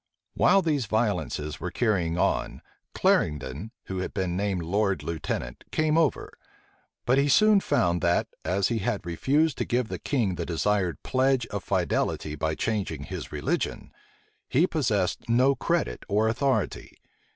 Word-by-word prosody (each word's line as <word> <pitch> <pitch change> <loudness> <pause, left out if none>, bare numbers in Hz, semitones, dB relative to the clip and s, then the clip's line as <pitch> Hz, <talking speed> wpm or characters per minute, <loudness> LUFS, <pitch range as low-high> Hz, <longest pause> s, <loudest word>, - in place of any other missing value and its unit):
While 195 -1 +4
these 145 -8 0
violences 90 - -1
were 90 - -3
carrying 90 -7 0
on, - - 0 0.3
Clarendon, 75 +6 +1
who 95 -1 -5
had 95 - -4
been 95 -3 -1
named 95 -2 -1
lord 100 +3 0
lieutenant, 75 -6 -4
came 155 -1 +1
over; 160 -4 +1 0.7
but 130 +3 +3
he 140 +1 +2
soon 215 +6 +6
found, 85 - +1
that, 85 0 +2 0.2
as 95 +4 +1
he 115 -2 0
had 105 -2 -2
refused 140 - +1
to - - +1
give 120 -2 -1
the - - -4
king 115 -10 0
the - - -2
desired 90 0 0
pledge 130 -1 +2
of 100 -3 -4
fidelity 75 - -1
by 80 +1 -1
changing 105 0 -2
his - - -7
religion, - - -2 0.6
he - - +4
possessed - - -1
no 130 +4 +4
credit 60 - -1
or 105 +2 +2
authority. 135 +4 -1
105 Hz, 150 wpm, -26 LUFS, 85-130 Hz, 0.7 s, soon